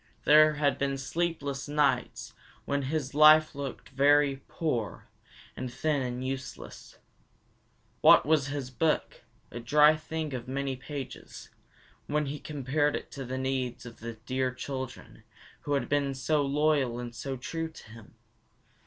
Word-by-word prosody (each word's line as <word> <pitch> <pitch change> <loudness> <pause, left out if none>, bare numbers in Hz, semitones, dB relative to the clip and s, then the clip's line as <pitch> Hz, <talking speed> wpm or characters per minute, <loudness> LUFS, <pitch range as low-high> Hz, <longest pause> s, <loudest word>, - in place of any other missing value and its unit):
There 155 +1 +6
had 145 -1 0
been 140 0 0
sleepless 140 -1 -3
nights 145 -1 0 0.3
when 140 0 0
his 150 -3 -2
life 155 +1 +7
had - - -22
looked 140 -3 -6
very 140 0 +3
poor 120 - -3 0.5
and 130 - -5
thin 145 +3 0
and 125 0 -3
useless. 130 -1 -7 1.0
What - - +7
was 150 -3 +2
his 135 -2 -4
book, 155 +4 -1 0.3
a 120 - -6
dry 150 +6 +5
thing 155 -1 -5
of 125 -2 -5
many 135 0 -2
pages, 135 -1 -8 0.6
when 150 +1 0
he 145 +1 -5
compared 145 0 -1
it - - -6
to 135 - -6
the 130 +1 -4
needs 130 -2 -2
of 120 -1 -11
the 115 +1 -6
dear 130 +3 -2
children 130 -2 -7 0.4
who 145 - -1
had 140 - 0
been 140 -1 0
so 145 +4 +1
loyal 140 -3 +1
and 120 -1 -6
so 135 +2 -5
true 165 +5 -4
to 160 - -14
him? 115 -2 -14
140 Hz, 150 wpm, -29 LUFS, 130-150 Hz, 1.0 s, life